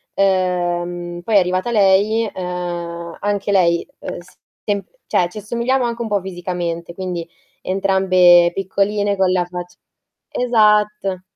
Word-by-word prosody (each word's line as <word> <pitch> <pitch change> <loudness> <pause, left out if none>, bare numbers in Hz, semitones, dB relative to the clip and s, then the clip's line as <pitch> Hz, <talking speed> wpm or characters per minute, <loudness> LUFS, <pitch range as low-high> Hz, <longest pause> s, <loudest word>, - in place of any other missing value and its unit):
ehm, 175 -2 0
poi 220 +1 0
è - - +9
arrivata 185 +4 +1
lei, 210 +1 +3
ehm, 175 -2 -5
anche 205 0 -1
lei, 170 -3 +2
ehm, - - -6
s 175 - -17 0.3
temp 200 -1 -2 0.2
cioè 175 -1 +1
ci 215 - -12
assomigliamo 235 +5 -1
anche 235 0 -2
un 230 - -2
po' 205 -1 +1
fisicamente, 175 -2 -5
quindi 175 -3 -4 0.3
entrambe 185 -2 +4
piccoline 200 +1 0
con 190 -1 +3
la 180 -1 +1
fac 180 0 -7 0.6
esatto 210 -5 +2
185 Hz, 130 wpm, -19 LUFS, 175-205 Hz, 0.6 s, è